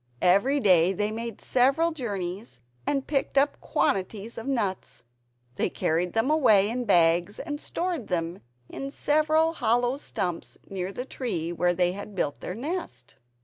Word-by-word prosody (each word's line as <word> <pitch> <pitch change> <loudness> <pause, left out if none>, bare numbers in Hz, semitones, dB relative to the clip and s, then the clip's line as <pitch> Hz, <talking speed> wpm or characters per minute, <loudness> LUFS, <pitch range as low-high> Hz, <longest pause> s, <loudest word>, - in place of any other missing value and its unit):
Every 200 +11 +4
day 185 -5 +5
they 210 +2 -1
made 230 -1 -5
several 275 +7 +3
journeys 200 - -5 0.3
and 275 -2 0
picked 280 -1 -1 0.2
quantities 200 +3 -1
of 225 - -8
nuts. 205 -9 -2 0.5
They - - +1
carried 170 +3 -1
them 225 +6 +1
away 215 -10 +5
in 245 +1 -2
bags, 175 0 +3
and 290 0 -5
stored 345 - -3
them 170 0 -2 0.3
in 275 - -6
several 310 +3 +2
hollow 245 -1 +1
stumps 175 - -4
near 190 -1 -4
the 250 +5 -5
tree 175 -12 -3
where 175 +1 +1
they 180 0 +2
had 200 +2 -8
built 145 -5 -1
their 180 - -5
nest. 300 - -6
215 Hz, 145 wpm, -26 LUFS, 180-275 Hz, 0.5 s, day